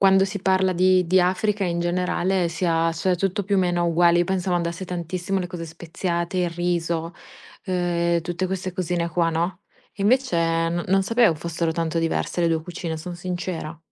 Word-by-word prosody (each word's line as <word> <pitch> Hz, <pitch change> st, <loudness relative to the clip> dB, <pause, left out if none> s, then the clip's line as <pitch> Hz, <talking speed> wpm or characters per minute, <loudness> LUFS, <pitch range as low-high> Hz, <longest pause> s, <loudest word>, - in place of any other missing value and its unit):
quando 195 Hz, 0 st, +5 dB
si 195 Hz, +1 st, -4 dB
parla 190 Hz, 0 st, +2 dB
di 185 Hz, 0 st, +4 dB
di 185 Hz, +1 st, +5 dB
Africa, 205 Hz, +2 st, +1 dB
in 170 Hz, -1 st, -1 dB
generale, 180 Hz, +1 st, 0 dB
si 165 Hz, +2 st, -3 dB
ha 165 Hz, 0 st, +2 dB
cioè 180 Hz, +2 st, 0 dB
tutto 195 Hz, +3 st, -1 dB
più 200 Hz, +1 st, 0 dB
o -, -, +4 dB
meno 175 Hz, -2 st, +1 dB
uguale. 170 Hz, 0 st, +4 dB
Io 175 Hz, -, +3 dB
pensavo 185 Hz, 0 st, -1 dB
andasse 170 Hz, +1 st, -2 dB
tantissimo 180 Hz, +2 st, -3 dB
le 180 Hz, -, -4 dB
cose 170 Hz, -2 st, -6 dB
speziate, 170 Hz, +2 st, -3 dB
il 180 Hz, -1 st, +1 dB
riso, 170 Hz, -1 st, -1 dB, 0.5 s
eh, 170 Hz, -2 st, +1 dB
tutte 175 Hz, +2 st, -2 dB
queste 185 Hz, 0 st, -3 dB
cosine 175 Hz, -2 st, -1 dB
qua, 170 Hz, 0 st, +1 dB
no, 170 Hz, +4 st, -2 dB, 0.3 s
e 200 Hz, -, -6 dB
invece 255 Hz, -1 st, +2 dB, 0.3 s
non 170 Hz, +1 st, -2 dB
non 195 Hz, +1 st, +3 dB
sapevo 230 Hz, -2 st, +3 dB
fossero 165 Hz, +1 st, -2 dB
tanto 165 Hz, 0 st, -1 dB
diverse 165 Hz, +2 st, -1 dB
le 170 Hz, -, +3 dB
2 160 Hz, -1 st, 0 dB
cucine, 170 Hz, -1 st, -5 dB
son 175 Hz, +3 st, -7 dB
sincera. 175 Hz, -2 st, -4 dB
175 Hz, 190 wpm, -23 LUFS, 170-185 Hz, 0.5 s, quando